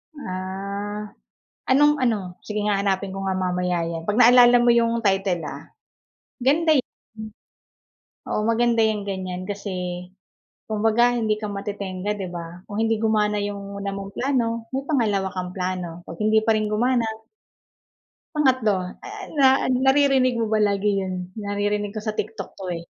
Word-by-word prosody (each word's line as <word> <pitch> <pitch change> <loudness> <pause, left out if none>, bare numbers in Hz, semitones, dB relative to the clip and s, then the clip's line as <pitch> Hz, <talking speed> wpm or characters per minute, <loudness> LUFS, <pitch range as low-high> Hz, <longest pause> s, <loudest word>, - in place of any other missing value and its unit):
Ah, 200 -1 -5 0.6
anong 295 +3 +4
ano? 200 -7 -1
Sige 210 -1 -2
nga 205 -1 +1
hanapin 195 -1 0
ko 195 - -6
nga 190 - 0
mamaya 180 -1 0
yan, 165 -1 -4
'pag 205 - 0
naalala 245 0 +8
mo 240 - +5
yung 235 0 +2
title, 195 -3 +1
ah. - - -6 0.8
Ganda 310 +5 +4
eh, 270 - +3 0.3
hmm. 220 0 -8 1.0
Oo - - +1
maganda 230 +1 +2
yung 215 -1 0
ganyan, 185 -1 -4
kasi 180 -3 -4 0.6
kumbaga 225 +3 +3
hindi 215 -2 +1
ka 210 - -3
matetengga, 200 -1 -4
'di 190 -2 -5
ba? 170 0 -7
Kung 205 - -6
hindi 225 0 +2
gumana 210 -2 +1
yung 200 -1 -5
una 200 0 -3
mong 195 0 -7
plano, 230 -4 -1
may 270 +1 -2
pangalawa 215 -10 +1
kang 180 -1 -4
plano, 180 -2 -3
'pag 165 - -10
hindi 215 +1 +4
pa 225 - +4
rin 215 -1 0
gumana 235 +2 +1 1.3
Pangatlo, 255 -8 +3 0.3
ah, 405 0 -8 0.2
na 270 - +7 0.4
naririnig 265 -2 +4
mo 225 - 0
ba 215 - +3
lagi 200 +1 +1
yun? 185 -1 -5
Naririnig 205 0 -1
ko - - -2
sa 215 -1 -3
TikTok 215 +2 -4
'to, 195 - -8
eh. 165 - -9
210 Hz, 155 wpm, -23 LUFS, 190-230 Hz, 1.3 s, naalala